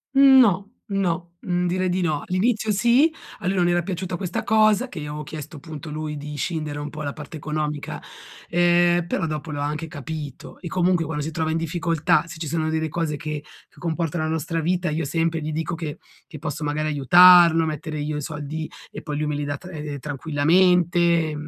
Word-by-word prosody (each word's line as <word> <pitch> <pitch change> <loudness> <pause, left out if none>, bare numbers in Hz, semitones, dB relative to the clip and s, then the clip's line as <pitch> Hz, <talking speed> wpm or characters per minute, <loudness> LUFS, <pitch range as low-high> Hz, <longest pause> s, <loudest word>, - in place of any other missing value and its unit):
No, 250 -8 +6 0.2
no. 185 -3 -1
Mhmm 180 0 0
direi 185 +1 0
di 180 +1 0
no. 155 -4 0
All'inizio 215 +4 +1
sì, 240 +10 +4 0.3
a 180 - -4
lui 195 - +1
non 175 -1 +3
era 175 0 +2
piaciuta 180 0 -4
questa 185 -3 -3
cosa, 215 +3 +3
che 180 - -7
io 150 - -5
avevo 150 +1 -5
chiesto 155 +1 -8
punto 155 0 -8
lui 150 0 -4
di 150 +1 -7
scindere 150 0 -3
un 145 - -5
po' 155 +1 -8
la 140 -1 -3
parte 155 +1 -9
economica, 150 -1 -3 0.5
ehm, 175 0 +3
però 185 +1 -1
dopo 155 0 -4
lo 145 -1 -3
ha - - 0
anche 150 +2 -3
capito. 150 -1 -7
E 175 - -7
comunque 180 -1 +1
quando 150 -2 -3
si 160 - -4
trova 160 0 -1
in 160 - 0
difficoltà, 165 +1 +1
se 160 - -9
ci 160 - -4
sono 160 +1 -1
delle 160 0 -1
cose 160 -1 -2
che 150 -1 -4 0.3
che - - -29
comportano 165 -1 -2
la 155 - -2
nostra 160 +1 -2
vita, 175 +2 0
io 155 0 -1
sempre 165 +2 0
gli 155 +1 -3
dico 160 +2 -2
che 160 -3 -6 0.3
che 155 - -10
posso 150 0 -4
magari 150 +1 -1
aiutarlo, 170 +3 +7
mettere 155 0 -4
io 150 0 -2
i - - -3
soldi, 150 +1 -5 0.2
e - - -7
poi 150 -2 -4
lui 150 - -1
me 150 - -1
li 145 - -2
dà 145 0 -2
tra 180 - -12 0.3
tranquillamente, 170 +3 +2
160 Hz, 205 wpm, -23 LUFS, 150-175 Hz, 0.5 s, aiutarlo